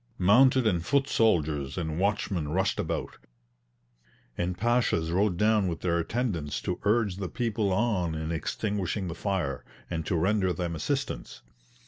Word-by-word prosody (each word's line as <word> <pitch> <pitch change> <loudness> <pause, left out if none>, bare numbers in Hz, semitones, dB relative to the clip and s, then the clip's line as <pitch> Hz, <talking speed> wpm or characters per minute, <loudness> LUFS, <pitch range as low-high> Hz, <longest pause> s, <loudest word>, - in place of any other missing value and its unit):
Mounted 125 +7 +5
and 90 -6 +1
foot 140 +6 +2
soldiers 75 - +1
and 80 -2 -2
watchmen 100 -5 0
rushed 95 +6 0
about, - - -3 1.2
and 90 +1 -2
Pashas 115 -7 +1
rode 95 0 +1
down 105 -1 +3
with 85 -2 -3
their 85 -2 +1
attendants 85 - -2
to - - -2
urge 105 -3 +2
the 95 -3 -4
people 115 -4 -1
on 95 -5 +1
in 80 +1 -3
extinguishing 95 +2 -2
the - - -3
fire, 85 -9 -2 0.3
and 80 -1 -2
to 90 - 0
render 95 +2 +2
them 85 -2 -3
assistance. 80 - -3
95 Hz, 145 wpm, -28 LUFS, 80-110 Hz, 1.2 s, Mounted